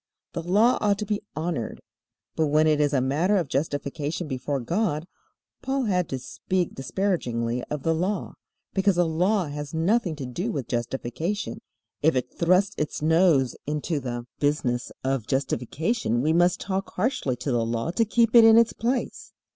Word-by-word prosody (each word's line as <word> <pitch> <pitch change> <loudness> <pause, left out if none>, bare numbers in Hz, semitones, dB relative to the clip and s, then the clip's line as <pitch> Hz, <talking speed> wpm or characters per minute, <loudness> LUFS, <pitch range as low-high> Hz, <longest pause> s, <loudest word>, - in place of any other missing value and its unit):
The 170 - -3
Law 205 +8 +3
ought 205 -1 +2
to 210 - -3
be 210 0 -1
honored. 155 -7 -3 0.6
But 160 - +2
when 155 +2 +3
it 155 -1 +3
is 145 -1 +2
a 135 -3 +2
matter 155 +10 +2
of 175 -5 0
justification 145 +3 -2
before 135 +1 -2
God, 165 - -1 0.6
Paul 270 0 -1
had 180 -6 0
to 135 - -2
speak 180 +7 -2
disparagingly 125 -7 -1
of 150 -2 -5
the 165 - +2
Law, 185 +4 -2 0.4
because 195 -1 +2
the 175 0 +3
Law 180 +5 +1
has 145 +1 -6
nothing 180 +1 +1
to 140 -3 -6
do 175 - -3
with 135 - -4
justification. 135 - -3 0.4
If 160 -1 +3
it 130 - -2
thrusts 185 +3 +2
its 150 0 -3
nose 160 -5 +3
into 150 +1 -1
the 120 -2 -5
business 140 -4 0
of 130 -4 -1
justification 135 - -1
we 155 +2 +2
must 175 +1 +3
talk 195 0 -3
harshly 220 - 0
to 130 +3 -3
the 120 -2 +1
Law 115 +7 -2
to 230 - +2
keep 230 +1 +2
it 235 - +10
in 225 0 +8
its 230 0 +4
place. 245 +3 -2
160 Hz, 170 wpm, -25 LUFS, 135-195 Hz, 0.6 s, it